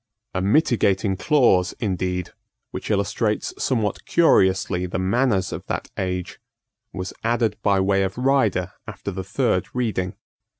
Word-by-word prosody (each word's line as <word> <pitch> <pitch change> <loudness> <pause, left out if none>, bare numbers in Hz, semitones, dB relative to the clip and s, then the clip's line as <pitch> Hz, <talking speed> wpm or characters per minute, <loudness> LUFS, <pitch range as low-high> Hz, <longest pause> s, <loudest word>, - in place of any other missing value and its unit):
A 95 - -1
mitigating 100 - +2
clause 95 - +3
indeed, 90 -3 -2 0.4
which - - -6
illustrates 105 +1 0
somewhat 110 -6 0
curiously 95 - +3
the 90 - -3
manners 100 +1 +1
of - - -5
that - - -4
age, 90 -1 -3 0.5
was 90 0 -5
added 115 -1 +1
by 100 -2 +3
way 95 +1 +2
of 95 +2 -2
rider 115 -9 +1
after 100 - -6
the 95 0 -5
third 110 -1 0
reading. 105 -7 -1
100 Hz, 130 wpm, -23 LUFS, 95-115 Hz, 0.5 s, clause